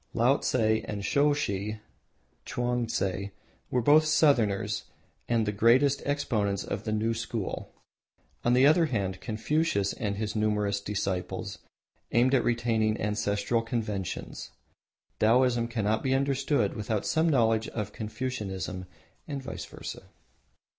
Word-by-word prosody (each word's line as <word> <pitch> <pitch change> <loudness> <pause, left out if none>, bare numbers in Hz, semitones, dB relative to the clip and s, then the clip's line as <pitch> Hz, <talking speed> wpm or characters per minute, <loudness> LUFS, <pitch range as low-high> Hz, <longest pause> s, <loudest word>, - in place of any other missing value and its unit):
Laotse 125 +3 +2 0.3
and 100 -2 -4
Soshi 110 -8 +1 0.6
(Chuangtse) 115 -6 -1 0.4
were 125 -2 0
both 155 +4 +6
Southerners 125 -10 +2 0.4
and 115 -2 +2
the 105 - 0
greatest 130 +7 +4
exponents 110 -9 0
of 100 +2 -5
the 110 - -1
New 110 +2 +1
School. 115 -3 -4 0.7
On 120 - +3
the 130 +2 +5
other 160 +3 +5
hand, 95 -7 -2
Confucius 110 -2 0
with 105 -4 -3
his 105 +1 -3
numerous 105 -2 0
disciples 95 -3 -3 0.5
aimed 125 +3 +3
at 130 - +4
retaining 115 -2 +1
ancestral 105 +2 0
conventions. 110 -5 -4 0.7
Taoism 120 +1 +3
cannot 110 -2 0
be 130 0 +1
understood 140 +1 +1
without 105 -2 -2
some 160 +1 +2
knowledge 115 -5 +2
of 105 -3 -4
Confucianism 105 -5 -4 0.4
and 140 -3 -4
vice - - -6
versa. - - -9
115 Hz, 120 wpm, -28 LUFS, 105-130 Hz, 0.7 s, both